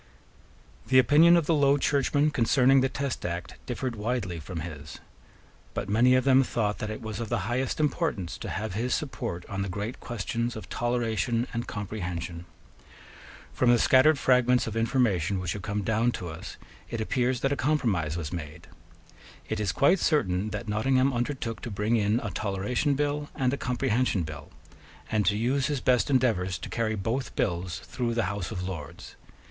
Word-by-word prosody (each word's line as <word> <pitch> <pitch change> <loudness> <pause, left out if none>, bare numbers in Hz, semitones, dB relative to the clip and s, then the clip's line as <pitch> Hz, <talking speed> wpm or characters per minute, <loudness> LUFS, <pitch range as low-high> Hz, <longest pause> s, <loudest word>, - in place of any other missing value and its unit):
The 130 - +4
opinion 155 +7 +7
of 170 - +1
the 165 - +2
Low 140 -2 +4
Churchmen 145 +1 +2
concerning 130 +2 +4
the 130 - +2
Test 140 -1 -3
Act 85 0 -5
differed 125 0 -3
widely 105 -5 -2
from 80 +1 -6
his. 75 -2 -8 0.8
But 105 - -3
many 120 +5 +5
of 130 - +3
them 135 -1 +5
thought 110 -5 -1
that 110 - -3
it 110 +2 -6
was 110 -2 -5
of 115 -2 -4
the 120 -3 0
highest 125 +6 -1
importance 150 - -1
to - - -5
have 105 0 -3
his 120 +4 0
support 90 - -4
on 100 -2 -4
the 100 - -2
great 105 +6 -4
questions 120 +1 -3
of 110 - -8
Toleration 120 -1 0
and 120 +1 -3
Comprehension. 90 -4 -5 1.1
From 125 - +2
the 120 - +6
scattered 130 +8 +5
fragments 125 -1 +3
of 110 - -5
information 115 - +1
which 90 -2 -2
have 105 - -6
come 105 +2 -2
down 110 +4 +2
to 90 - -5
us, 80 - -8 0.3
it 115 - -4
appears 125 +3 0
that 135 - +1
a - - 0
compromise 110 - 0
was 80 0 -4
made. 75 -3 -7 0.8
It 110 - -2
is 105 -4 0
quite 175 - +3
certain 105 - +1
that 110 - -5
Nottingham 130 +5 +2
undertook 120 -2 -3
to - - -5
bring 105 +3 0
in 105 +1 +2
a 105 - -4
Toleration 105 - -1
Bill 145 +1 -1
and 130 -1 +1
a - - +2
Comprehension 125 -6 0
Bill, 75 -2 -8 0.6
and 105 -2 +1
to 105 - +3
use 130 +5 +1
his 145 -3 -1
best 125 +2 +2
endeavours 110 -9 +1
to - - -8
carry 110 -1 -1
both 115 +7 -3
bills 90 -1 -2
through 120 -2 -2
the 115 - +1
House 100 -3 -4
of 90 - -4
Lords. 80 -7 -8
115 Hz, 180 wpm, -27 LUFS, 100-130 Hz, 1.1 s, opinion